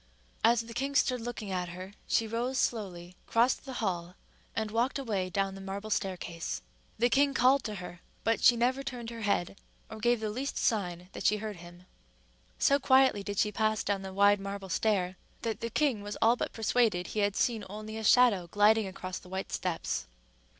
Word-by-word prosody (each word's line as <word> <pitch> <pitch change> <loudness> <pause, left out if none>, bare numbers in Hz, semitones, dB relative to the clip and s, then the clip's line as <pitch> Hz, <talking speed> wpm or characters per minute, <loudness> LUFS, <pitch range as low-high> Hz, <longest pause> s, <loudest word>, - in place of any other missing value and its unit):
As 235 0 +5
the 230 0 -9
king 275 +4 -2
stood 250 -3 +2
looking 225 -4 -5
at 180 -1 -2
her, 185 +3 -8
she 225 - +2
rose 235 +4 -2
slowly, 185 -8 -2
crossed 240 +4 +2
the 265 - -6
hall, 175 -1 -3 0.4
and 220 -1 -2
walked 240 +6 +1
away 205 -9 -2
down 195 +1 -1
the 195 - -9
marble 200 +3 -5
staircase. 170 - -3 0.3
The 240 - +4
king 275 +2 +3
called 260 +2 +4
to 215 -2 -3
her; 180 -2 -8 0.2
but 225 +1 +1
she 245 - +7
never 250 +3 +1
turned 245 -4 -6
her 230 -1 -7
head, 200 -3 0 0.3
or 220 - -7
gave 240 +1 +2
the 215 -1 -2
least 265 +6 -3
sign 180 -5 -1
that - - 0
she 210 - +3
heard 210 -2 -5
him. 175 +1 -13 0.7
So 280 +1 +4
quietly 260 -5 +4
did 200 0 -5
she 210 - +2
pass 215 0 0
down 200 -1 -1
the 190 0 -6
wide 200 +1 +4
marble 195 0 -6
stair, 185 -1 0 0.3
that 225 -1 -2
the 230 - -3
king 255 -3 +1
was 205 +1 -6
all 230 +2 +5
but - - -3
persuaded 220 -5 +1
he 215 - -4
had 205 -1 +1
seen 225 -4 +1
only 215 +2 -7
a 220 - -5
shadow 215 -5 +5
gliding 210 +3 +4
across 185 -1 -6
the 180 - -15
white 190 +1 -4
steps. 165 - -2
210 Hz, 200 wpm, -30 LUFS, 190-235 Hz, 0.7 s, she